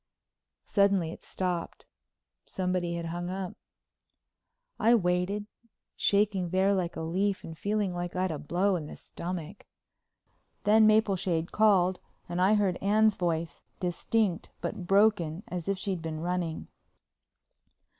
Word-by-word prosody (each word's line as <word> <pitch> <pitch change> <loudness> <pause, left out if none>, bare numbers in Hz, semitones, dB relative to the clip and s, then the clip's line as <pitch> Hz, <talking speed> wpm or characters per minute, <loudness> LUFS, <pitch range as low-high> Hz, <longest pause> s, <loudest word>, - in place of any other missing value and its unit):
Suddenly 200 -5 +2
it - - -10
stopped—somebody 180 0 -4
had 170 0 -4
hung 175 +1 -4
up. 185 -1 -4 1.3
I 230 +2 +5
waited, 180 +1 0 0.5
shaking 200 -3 +1
there 190 +3 +3
like 180 -3 -1
a 160 - -4
leaf 190 +5 -1
and 160 - -8
feeling 205 +1 -1
like 175 0 -4
I'd 185 -1 0
a 155 - -4
blow 180 +6 +1
in 155 -3 -6
the - - -8
stomach. 180 +2 -7 1.0
Then 215 +1 +6
Mapleshade 195 -6 +2
called 190 -4 +3 0.3
and 175 +1 -2
I 195 +4 +5
heard 195 -4 +1
Anne's 215 +2 +4
voice, 170 -3 -2 0.2
distinct 185 +1 0
but 175 - -5
broken 195 -4 +3
as 180 0 -4
if 195 - 0
she'd 190 -2 -3
been 160 -1 -4
running. 175 -1 -2
185 Hz, 125 wpm, -29 LUFS, 170-200 Hz, 1.3 s, Then